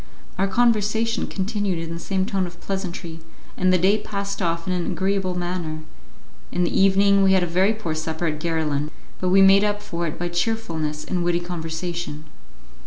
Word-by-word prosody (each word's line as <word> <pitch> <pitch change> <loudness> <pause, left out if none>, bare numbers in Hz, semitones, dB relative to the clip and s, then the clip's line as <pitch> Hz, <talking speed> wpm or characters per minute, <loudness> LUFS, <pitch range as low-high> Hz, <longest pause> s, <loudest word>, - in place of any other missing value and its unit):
Our 195 - +3
conversation 225 +1 +2
continued 200 -2 -1
in 165 0 -4
the 170 - -5
same 190 +1 -1
tone 190 -2 -1
of 175 0 -12
pleasantry, 175 -4 -5 0.4
and 185 0 +2
the 185 - +5
day 195 +4 +3
passed 200 -1 -4
off 170 -1 -1
in 185 - -1
an 175 -1 -1
agreeable 190 -1 0
manner; 175 -3 -3 0.7
in 180 - +1
the 175 - -1
evening 195 +1 +5
we 190 0 +5
had 190 -1 +4
a - - +2
very 185 +5 +2
poor 195 -7 -3
supper 160 +1 -3
at 155 -2 -1
Garillan, 155 -3 -1 0.3
but 185 - 0
we 195 +1 +6
made 195 +1 +7
up 205 0 +1
for 170 -5 -3
it 155 - -5
by 175 - -2
cheerfulness 170 -5 -2
and 180 -2 -1
witty 175 0 +2
conversation. 170 -2 -4
180 Hz, 185 wpm, -23 LUFS, 170-195 Hz, 0.7 s, made